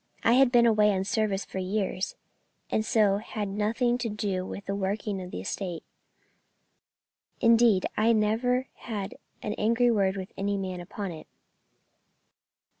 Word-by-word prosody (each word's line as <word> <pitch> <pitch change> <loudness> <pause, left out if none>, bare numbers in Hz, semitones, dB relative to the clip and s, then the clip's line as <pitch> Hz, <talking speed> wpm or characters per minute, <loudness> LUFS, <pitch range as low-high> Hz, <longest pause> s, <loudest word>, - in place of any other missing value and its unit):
I 230 - +5
had 260 0 +5
been 240 -1 +5
away 210 -2 +4
on 190 0 0
service 205 0 0
for 190 - -6
years, 190 0 -2 0.6
and 215 - +1
so 210 -3 +3
had 210 -1 -4
nothing 225 +5 0
to 235 - -2
do 200 -3 -2
with 200 - -7
the 195 - -2
working 200 0 -2
of 180 - -7
the 90 - -5
estate, 175 - -4 1.6
indeed 230 -4 +5
I 220 +2 +3
never 230 +4 +1
had 205 -4 -5 0.3
an 210 - -2
angry 235 +3 +3
word 200 -3 +1
with 190 -1 -7
any 200 +1 -1
man 185 -2 -4
upon 195 +1 -5
it." 160 -2 -10
210 Hz, 150 wpm, -28 LUFS, 195-230 Hz, 1.6 s, I